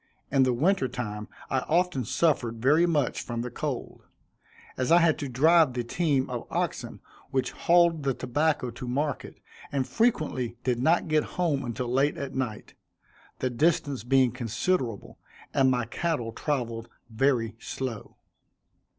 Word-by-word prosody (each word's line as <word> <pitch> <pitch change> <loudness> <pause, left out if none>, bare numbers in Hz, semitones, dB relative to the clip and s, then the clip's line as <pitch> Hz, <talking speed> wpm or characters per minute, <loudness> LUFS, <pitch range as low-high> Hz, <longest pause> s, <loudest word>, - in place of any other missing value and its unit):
In 135 - +4
the 130 -1 +4
winter 150 +4 +2
time 105 -4 -5 0.2
I 130 - +2
often 165 -3 0
suffered 125 -3 +1
very 150 +8 +4
much 145 -7 0
from 120 -1 -4
the 125 - -5
cold; 140 0 -4 0.7
as 130 +4 -1
I 170 - +8
had 165 -2 +3
to 145 - -4
drive 155 +3 +4
the 120 -1 -2
team 140 +1 0
of 120 -2 -5
oxen - - -3 0.3
which 130 -1 -1
hauled 170 -2 +3
the 135 -2 0
tobacco 130 0 0
to 120 +2 -8
market, 140 +3 -2 0.4
and 135 -2 -1
frequently 150 - 0
did 125 -2 0
not 160 +7 +2
get 155 -1 +2
home 165 -6 +1
until 120 0 -3
late 135 +4 +1
at 140 -1 -5
night, 125 -6 -4 0.6
the 130 - -1
distance 140 -2 +1
being 130 0 +3
considerable, 125 - -2 0.3
and 135 -2 +4
my 125 -2 +1
cattle 125 -2 -2
traveled 115 -3 -3 0.2
very 115 -1 +1
slow. 120 -5 -6
130 Hz, 150 wpm, -27 LUFS, 120-155 Hz, 0.7 s, I